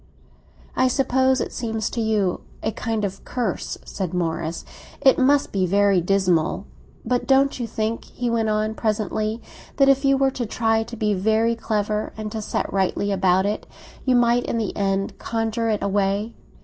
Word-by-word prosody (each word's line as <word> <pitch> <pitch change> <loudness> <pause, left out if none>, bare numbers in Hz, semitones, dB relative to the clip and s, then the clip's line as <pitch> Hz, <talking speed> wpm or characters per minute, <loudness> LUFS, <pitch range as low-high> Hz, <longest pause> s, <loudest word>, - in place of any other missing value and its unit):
"I 255 - +3
suppose 260 0 +2
it - - -4
seems 225 -3 -2
to 235 - -2
you 210 -5 0 0.2
a 220 - 0
kind 220 -2 -2
of 195 0 -6
curse," 235 -8 -3
said 185 -3 -4
Morris. 165 -1 -2 0.3
"It 265 - +5
must 280 +2 +3
be 190 -2 +1
very 200 0 +3
dismal. 185 -1 +1 0.4
But 245 +1 0
don't 270 0 +3
you 240 - -2
think," 220 +1 -2
he 245 - -4
went 230 -2 +1
on 215 0 0
presently, 215 0 -1 0.3
"that 275 -1 +5
if 275 +1 +4
you 275 0 +4
were 270 0 +2
to 245 -3 -3
try 225 0 +1
to 235 +1 -7
be 210 -1 +1
very 220 +4 +2
clever, 210 -2 -2
and 215 -1 -5
to 220 - -4
set - - -3
rightly 195 +1 0
about 190 -1 +3
it, 210 +1 -2 0.4
you 255 -1 +3
might 240 0 +3
in - - -2
the 220 -3 -2
end 195 -1 -1
conjure 225 0 -1
it 210 -2 0
away? 200 +2 0
220 Hz, 175 wpm, -23 LUFS, 200-235 Hz, 0.4 s, It